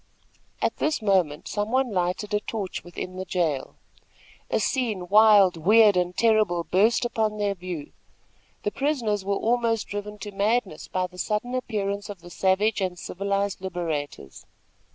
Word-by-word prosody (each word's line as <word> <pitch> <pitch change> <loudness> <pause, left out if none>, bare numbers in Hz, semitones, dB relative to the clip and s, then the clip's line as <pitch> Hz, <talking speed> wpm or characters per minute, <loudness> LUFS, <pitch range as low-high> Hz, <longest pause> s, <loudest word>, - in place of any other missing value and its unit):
At - - 0
this 305 0 0
moment 185 -8 +1
some 205 0 -2
one 260 -1 +1
lighted 185 +3 -1
a 210 - +3
torch 210 -3 -5
within 180 +1 -7
the 185 - -3
jail. 170 -7 -1 0.7
A - - +1
scene, 220 -9 -1
wild, 205 -3 +6
weird 210 +5 +5
and 180 0 0
terrible 215 -7 +3
burst 215 +8 +2
upon 220 -3 -1
their 205 -1 0
view. 180 -5 -7 0.7
The 210 - -1
prisoners 230 -5 -1
were 200 +1 0
almost 230 0 +1
driven 205 +1 -5
to 205 +1 -7
madness 200 -4 -1
by 185 0 -1
the 180 0 -11
sudden 215 +6 -2
appearance 205 -5 -2
of 200 -4 -8
the 175 0 -12
savage 195 +4 +1
and 185 -2 -2
civilized 200 +2 -2
liberators. 160 - -5
200 Hz, 155 wpm, -25 LUFS, 180-215 Hz, 0.7 s, wild